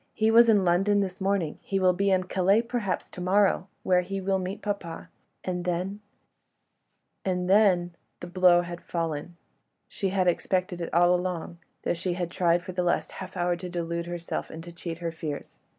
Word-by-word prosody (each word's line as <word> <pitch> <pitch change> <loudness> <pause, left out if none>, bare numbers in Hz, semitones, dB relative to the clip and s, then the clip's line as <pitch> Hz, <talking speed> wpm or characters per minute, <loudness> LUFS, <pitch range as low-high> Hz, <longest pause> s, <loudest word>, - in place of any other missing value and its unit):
"He 220 0 +3
was 230 +1 +7
in 205 -4 +4
London 195 +4 +3
this 190 -1 -4
morning; 190 -5 0
he 195 - -1
will 185 -1 +4
be 200 +2 +1
in 185 -1 +3
Calais, 190 +4 +2
perhaps, 230 -5 -2
to 180 - -8
morrow... 190 0 +2 0.2
where 180 -1 +3
he 195 +2 -4
will 190 0 0
meet 190 +3 -5
papa... 200 -6 -4 0.3
and 180 -1 -3
then... 180 +3 -2 1.2
and 180 -1 -1
then.. 185 -3 +4
." - - -48
The - - -5
blow 175 0 +4
had 175 0 -7
fallen. 165 0 -4 0.5
She 195 - -2
had 185 -1 +1
expected 180 0 0
it 170 - -4
all 175 +1 +5
along, 180 -1 -3 0.2
though - - +1
she 175 +1 -2
had 175 -1 -3
tried 175 -1 +2
for 185 - -6
the 180 0 -1
last 175 -1 0
half 185 0 -8
hour 175 0 +1
to 180 +1 -7
delude 170 -1 -3
herself 175 -1 -4
and 160 +1 -8
to 175 - -9
cheat 170 -1 -6
her 170 -1 -3
fears. 155 -3 -6
180 Hz, 195 wpm, -27 LUFS, 175-195 Hz, 1.2 s, was